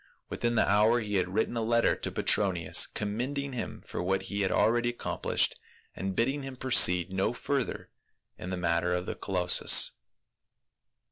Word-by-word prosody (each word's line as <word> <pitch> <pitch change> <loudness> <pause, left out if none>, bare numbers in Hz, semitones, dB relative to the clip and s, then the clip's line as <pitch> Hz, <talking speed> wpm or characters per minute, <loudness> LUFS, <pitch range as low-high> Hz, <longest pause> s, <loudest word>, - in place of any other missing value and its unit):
Within 120 0 -2
the - - +2
hour 105 +4 +3
he 105 -3 -2
had 90 -1 -1
written 110 +4 -1
a 115 - -1
letter 115 +1 +2
to - - -4
Petronius, 90 -5 +2
commending 130 +7 -4
him 125 - -6
for - - -5
what 95 +2 -1
he 100 +1 -4
had 95 -2 0
already 120 +5 +2
accomplished, 120 - -1 0.4
and 95 0 -4
bidding 135 +7 0
him 135 -1 -8
proceed 90 -8 +3
no 95 +5 0
further 135 +1 -4 0.4
in 90 - -8
the 90 - -4
matter 85 0 0
of 90 0 -3
the - - -4
colossus. 90 -2 +3
105 Hz, 160 wpm, -28 LUFS, 90-120 Hz, 0.4 s, hour